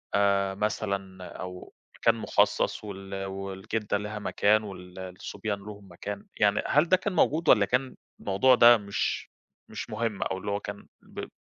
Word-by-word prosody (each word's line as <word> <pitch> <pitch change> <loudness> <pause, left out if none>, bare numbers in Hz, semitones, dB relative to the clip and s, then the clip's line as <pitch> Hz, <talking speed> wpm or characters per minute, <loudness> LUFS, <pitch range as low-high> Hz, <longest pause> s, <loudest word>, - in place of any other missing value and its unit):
آآ 100 -1 +3
مثلًا 100 -2 -2 0.2
أو 90 0 -8 0.3
مكان - - +4
مخصص - - +1
وال 95 -1 -6
والجدّة 95 +2 -3
ليها 105 +1 -5
مكان 105 +1 +2
وال 90 -2 -9
الصُبيان 95 +2 -5
ليهم 105 -1 -10
مكان؟ 100 +3 -6
يعني 105 -1 +3
هل 150 +4 +3
ده 185 - +6
كان 190 +1 -3
موجود 160 -1 +2
والّا 105 -3 +7
كان 125 +4 0 0.3
الموضوع 115 +7 +4
ده 120 0 +8
مش 100 -1 -2 0.4
مش - - -6
مهم؟ 110 -1 -2
أو 95 - -2
اللي 100 +2 -4
هو 100 - 0
كان 100 0 -8
ب - - -8
100 Hz, 155 wpm, -28 LUFS, 95-110 Hz, 0.4 s, ده